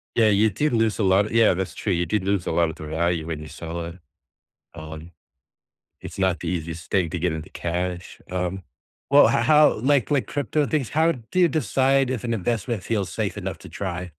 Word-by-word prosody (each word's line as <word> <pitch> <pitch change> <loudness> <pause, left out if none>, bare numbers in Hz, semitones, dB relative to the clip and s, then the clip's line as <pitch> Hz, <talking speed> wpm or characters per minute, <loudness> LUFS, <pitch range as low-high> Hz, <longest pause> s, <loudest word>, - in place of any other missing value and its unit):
Yeah, 115 -2 +4
you 105 +1 +4
did 145 +7 -1
lose 110 -1 +1
a - - +2
lot 95 +2 +3
Yeah, 115 -4 +5
that's 95 +1 -3
true, 100 - -2
you 85 0 0
did 95 +3 -1
lose 100 -2 0
a - - -1
lot 85 0 +2
of 80 - -7
the 80 - -9
value 80 +1 -1
when 80 -2 -4
you 75 - -8
sell 85 +2 -6
it. 85 +2 -9 0.7
Um, 80 +1 -9 0.9
it's - - -9
not 95 -2 +1
the 85 - -4
easiest 85 -1 -4
thing 90 -5 +1
to 85 - -3
get 90 -2 +1
into 80 -1 -6
cash. 90 +1 -4
Um, 90 +1 -2 0.5
well, 145 +1 +7
h - - +1
how, 150 -1 +6
like 140 +1 +2
like, 140 -3 +1
crypto 145 +1 -1
things 145 -7 -1
how 160 +2 +3
do 125 +7 -6
you 180 - +6
decide 135 -3 +2
if 125 -3 -3
an 115 -1 0
investment 110 0 -2
feels 105 -5 -1
safe - - -2
enough - - -5
to - - -12
try? 90 -2 -5
95 Hz, 215 wpm, -24 LUFS, 85-120 Hz, 0.9 s, well